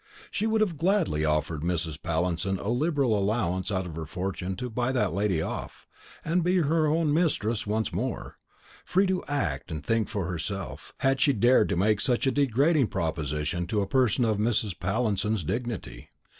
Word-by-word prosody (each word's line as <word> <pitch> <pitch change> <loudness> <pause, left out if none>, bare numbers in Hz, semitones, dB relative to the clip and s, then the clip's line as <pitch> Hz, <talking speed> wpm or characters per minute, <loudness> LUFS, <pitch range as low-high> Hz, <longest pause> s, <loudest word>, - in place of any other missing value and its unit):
She 215 - 0
would 220 0 +2
have 175 -8 0
gladly 170 - +2
offered 75 0 0
Mrs. 80 -2 -2
Pallinson 90 +3 -1
a 100 - -4
liberal 135 -2 +1
allowance 95 -3 0
out 95 -1 -1
of 85 -3 -7
her 80 -1 -5
fortune 90 +2 -3
to 125 +7 -4
buy 120 +2 -1
that 105 -9 +1
lady 95 -4 +1
off, - - -6 0.4
and 170 +2 +1
be 180 +2 +2
her 160 -1 +2
own 155 -1 +2
mistress 120 -11 0
once 110 -2 -1
more, 120 +8 -4 0.4
free 190 +2 +2
to 185 -1 0
act 100 - -2
and 75 -2 -5
think 115 +2 +1
for 105 -5 -2
herself, 90 +3 -5
had 135 0 +2
she 140 - +5
dared 120 0 +4
to - - +1
make 105 +2 +2
such 125 +1 +1
a 135 - +3
degrading 140 +1 +3
proposition 80 -1 -2
to 105 -2 0
a 100 - -1
person 125 -2 +2
of 110 -2 +1
Mrs. 105 -3 0
Pallinson's 105 +1 0
dignity. 115 +6 -4
110 Hz, 180 wpm, -27 LUFS, 90-135 Hz, 0.4 s, she